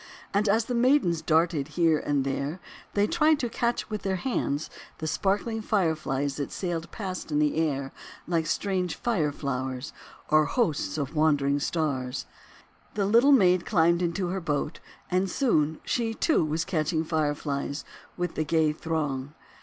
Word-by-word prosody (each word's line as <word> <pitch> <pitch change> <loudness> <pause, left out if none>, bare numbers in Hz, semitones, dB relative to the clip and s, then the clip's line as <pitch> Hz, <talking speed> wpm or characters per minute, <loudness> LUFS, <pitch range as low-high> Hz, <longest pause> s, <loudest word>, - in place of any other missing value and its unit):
And 200 +1 +2
as 220 +2 +3
the 245 - -3
maidens 240 - +3
darted 160 -3 +2
here 165 -3 +4
and 145 -2 0
there, 140 +5 -2 0.4
they 205 0 +4
tried 310 +3 +3
to 245 -4 -2
catch 235 +1 -1
with 215 - -3
their 195 -1 -1
hands 165 - -1 0.3
the 160 - -5
sparkling 205 +7 0
Fireflies 155 - 0
that 145 - -3
sailed 170 -3 -3
past 185 -6 -5
in 150 - +1
the 150 -1 +2
air 140 -4 -1 0.3
like 165 -2 0
strange 185 -1 -1
Fire 175 -12 0
Flowers 130 -2 -4 0.4
or 155 0 +5
hosts 150 - 0
of 140 -1 -3
wandering 145 -2 +3
Stars. 140 -5 -2 0.7
The 205 -2 +1
Little 235 +8 +5
Maid 185 -9 +5
climbed 170 -3 +3
into 175 +1 -1
her 190 +1 -2
boat, 150 -2 -2 0.3
and 185 +1 +1
soon 160 - +1
she, 225 -2 -1
too, 315 - +2
was 155 +2 -1
catching 160 -2 0
Fireflies 145 -2 -2 0.3
with 175 0 -2
the 155 - -1
gay 155 0 +2
throng. 150 -3 -3
165 Hz, 155 wpm, -27 LUFS, 150-195 Hz, 0.7 s, or